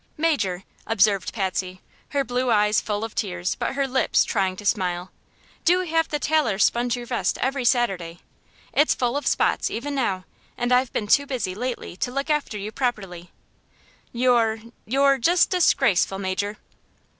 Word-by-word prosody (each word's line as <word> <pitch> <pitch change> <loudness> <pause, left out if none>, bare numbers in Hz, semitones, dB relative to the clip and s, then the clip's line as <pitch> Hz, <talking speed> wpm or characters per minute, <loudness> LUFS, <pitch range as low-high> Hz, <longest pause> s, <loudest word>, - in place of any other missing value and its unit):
"Major," 210 - 0 0.2
observed 205 -3 +2
Patsy, 185 -3 -3 0.3
her 280 -1 0
blue 250 0 -1
eyes 210 -1 +3
full 210 0 -3
of 225 - -5
tears 180 -3 -2
but - - -3
her 275 -1 0
lips 260 0 +2
trying 190 -4 0
to 205 - -10
smile, 180 -3 -1 0.5
"do 360 +2 +4
have 325 -2 0
the 300 - -1
tailor 295 -9 +1
sponge 240 +3 +2
your 240 - -6
vest 240 0 -1
every 270 0 -1
Saturday. 195 -9 0 0.6
It's 295 +2 +3
full 245 0 -1
of 290 - -2
spots - - +1
even 285 +6 -4
now, 195 -9 -1 0.3
and 245 +1 -1
I've 250 0 +2
been 210 - -2
too 280 +7 +3
busy 245 -9 -2
lately 245 -3 -5
to 245 - -2
look 275 +4 -2
after 290 -8 -1
you 205 +1 -5
properly. 195 -9 -3 0.8
You're 235 -3 +2 0.3
you're 275 +3 +3
just 345 +8 +3
disgraceful, 270 - +3
Major!" 200 +2 -3
235 Hz, 160 wpm, -24 LUFS, 195-270 Hz, 0.8 s, do